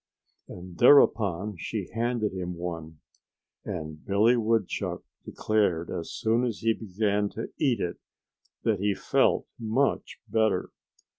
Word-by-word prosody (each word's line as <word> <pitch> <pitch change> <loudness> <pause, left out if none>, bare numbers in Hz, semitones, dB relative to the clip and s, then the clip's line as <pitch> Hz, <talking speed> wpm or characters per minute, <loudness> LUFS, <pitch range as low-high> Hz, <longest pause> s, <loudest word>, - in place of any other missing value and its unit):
And 90 -1 -10
thereupon 105 -7 +4
she - - -4
handed 115 -2 -1
him 90 -1 -4
one. 85 -2 -6 0.6
And 75 -1 -6
Billy 105 +5 +3
Woodchuck 115 -4 -1 0.2
declared 100 -6 0
as 85 - -5
soon 115 +1 +1
as 120 -4 -2
he 115 0 +3
began 105 -1 -1
to 115 - -5
eat 130 -8 +2
it 85 -2 -3 0.6
that 110 -4 +1
he 100 0 +1
felt - - +2
much 115 +5 0
better. 110 -1 +1
105 Hz, 125 wpm, -27 LUFS, 90-115 Hz, 0.6 s, thereupon